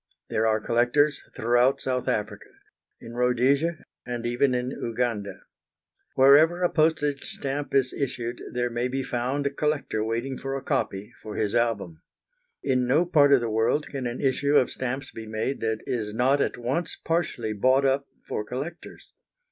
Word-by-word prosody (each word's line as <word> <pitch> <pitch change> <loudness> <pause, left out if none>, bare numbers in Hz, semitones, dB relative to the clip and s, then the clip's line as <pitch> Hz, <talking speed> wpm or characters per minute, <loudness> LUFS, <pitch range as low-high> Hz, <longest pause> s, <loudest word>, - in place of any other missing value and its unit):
There 110 +1 +2
are 110 0 +2
collectors 125 +7 +2
throughout 120 +3 +3
South 125 -1 -2
Africa, 105 -1 -2 0.5
in 115 - -10
Rhodesia, 130 +7 +1 0.2
and 120 -1 -5
even 125 +2 +2
in 125 +1 -2
Uganda. 115 -5 -3 0.7
Wherever 155 +7 +6
a 175 - +2
postage 155 -3 +1
stamp 140 0 -4
is 130 -2 +3
issued 120 -3 -3
there 120 0 -1
may 120 +1 -1
be 135 +1 -2
found 130 +3 -2
a 140 - +1
collector 145 -6 -1
waiting 115 +4 -3
for 135 +1 -3
a 135 - -5
copy 105 -8 -2
for 105 -1 -7
his 105 -1 -1
album. 105 -9 -1 0.6
In 125 -2 +1
no 150 +7 +3
part 145 -5 +4
of 135 -3 +6
the 120 - -1
world 110 +7 +1
can 135 -3 -3
an 120 +1 -5
issue 140 +1 +1
of 130 - +4
stamps 130 +1 -4
be 110 -1 -8
made 110 +5 -3
that 110 -1 -1
is 110 -3 -3
not 135 +4 +3
at - - -1
once 135 +8 -2
partially 160 -10 -1
bought 130 +6 +3
up 135 +1 +1 0.2
for 105 - -3
collectors. 140 +10 -7
125 Hz, 165 wpm, -26 LUFS, 115-140 Hz, 0.7 s, Wherever